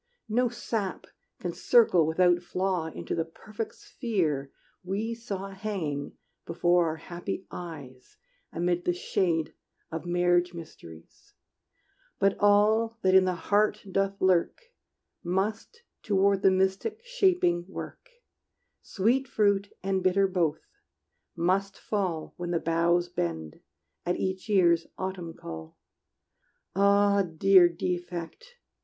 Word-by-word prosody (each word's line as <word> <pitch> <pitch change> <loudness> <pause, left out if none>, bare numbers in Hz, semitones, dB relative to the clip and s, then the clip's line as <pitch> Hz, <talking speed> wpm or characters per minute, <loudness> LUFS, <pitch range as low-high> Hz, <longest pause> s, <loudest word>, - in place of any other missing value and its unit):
No 245 +3 +2
sap 220 -5 -4 0.3
can 175 -1 -4
circle 185 -10 +4
without 175 +2 +3
flaw 180 -2 -1
Into 160 - -5
the 165 - 0
perfect 210 +7 -7
sphere 160 - -2 0.3
we 205 +5 -2
saw 200 -4 -5
Hanging 190 -8 -4 0.3
before 175 +1 +2
our 160 - -2
happy 175 +4 -6
eyes 145 -8 -9 0.3
Amid 175 +1 -1
the 175 - +1
shade 170 -3 0 0.4
of 165 +2 -5
marriage 175 0 +2
mysteries; 85 - -13 0.8
But 195 0 +2
all 215 +3 +3
that 185 0 +4
in 190 0 +7
the 185 -1 0
heart 210 +4 +1
doth 195 +1 0
lurk 185 - +2 0.6
Must 215 - -2 0.2
toward 200 -1 +2
the 195 - +6
mystic 190 - 0
shaping 365 - +2
work: 345 - -8 0.7
Sweet 245 +7 +1
fruit 200 -3 +1
and 190 -1 0
bitter 190 +2 +3
both 170 -5 0 0.7
must 190 +3 0
fall 185 -7 -3
When 175 -1 -4
the 170 -1 +1
boughs 170 +2 +2
bend, 80 - -4 0.4
at 175 +1 0
each 190 +3 -3
year's 170 -5 +4
autumn 185 -3 -5
call. 80 -1 -9 1.0
Ah, 200 0 +4
dear 180 +1 +5
defect! 175 - -5
185 Hz, 115 wpm, -28 LUFS, 170-200 Hz, 1.0 s, in